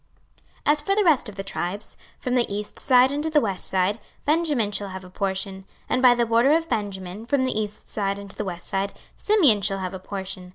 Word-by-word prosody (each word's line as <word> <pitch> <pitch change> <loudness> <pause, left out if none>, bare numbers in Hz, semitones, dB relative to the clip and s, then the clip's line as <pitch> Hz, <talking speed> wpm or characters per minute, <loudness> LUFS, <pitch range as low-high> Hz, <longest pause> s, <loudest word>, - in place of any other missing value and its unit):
26:048:023 - - +6
As 300 - -2
for 390 +6 +1
the 420 - +3
rest 295 - +3
of 205 - -11
the 195 - -4
tribes, 195 +1 -3 0.2
from 250 - -3
the 245 -4 +2
east 205 +1 -4
side 255 -1 +5
unto 295 +2 -1
the 310 -1 +4
west 200 -8 -2
side, 190 +3 +1 0.3
Benjamin 295 -9 +1
shall 200 -1 -2
have 190 0 -7
a 180 - -13
portion. 195 0 -2
26:048:024 - - -22 0.2
And 255 - +1
by 250 -2 +7
the 240 0 +2
border 230 +4 +4
of 330 +1 +1
Benjamin, 200 -2 -3
from 275 0 +2
the 255 -4 0
east 210 -1 -5
side 200 -1 -1
unto 200 -1 -9
the - - -3
west 175 -2 -5
side, 195 0 -1 0.2
Simeon 310 - +4
shall 195 0 +1
have 185 -1 -4
a 190 - -5
portion. 190 -1 -6
210 Hz, 235 wpm, -24 LUFS, 195-255 Hz, 0.3 s, by